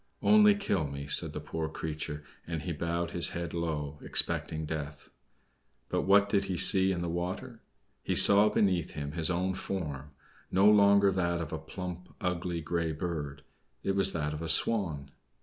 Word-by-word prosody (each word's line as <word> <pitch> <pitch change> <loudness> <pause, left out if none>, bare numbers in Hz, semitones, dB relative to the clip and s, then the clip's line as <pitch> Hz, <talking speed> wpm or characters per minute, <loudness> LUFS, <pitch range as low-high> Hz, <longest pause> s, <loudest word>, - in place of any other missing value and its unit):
"Only 210 -1 +6
kill 100 - -1
me," 70 0 -7
said 70 - +2
the - - -6
poor 80 -1 -5
creature, 75 -1 -6 0.2
and 80 -2 -4
he 90 - -4
bowed 85 +2 -3
his 85 - 0
head 85 -2 -5
low, 75 -3 -4
expecting 80 0 -1
death. 75 -1 -7 0.8
But - - -2
what 100 +1 +5
did 100 -1 0
he 95 - -3
see 95 +2 +6
in 85 -2 -3
the - - -3
water? 85 +2 -5 0.4
He - - -2
saw 100 +1 +8
beneath 90 -6 0
him 75 -1 -5
his 80 +1 -3
own 90 +2 -1
form, 75 -7 -5 0.4
no 95 +2 +2
longer 100 -1 +5
that 85 -2 -1
of 80 -3 -6
a 80 - -4
plump, 90 +2 -8
ugly 90 -2 -3
grey 85 0 -2
bird 75 -3 -5 0.4
it 95 - -1
was 95 0 +3
that 75 -2 -2
of 75 - -6
a 80 - -4
Swan. 80 -7 +1
85 Hz, 175 wpm, -29 LUFS, 80-95 Hz, 0.8 s, saw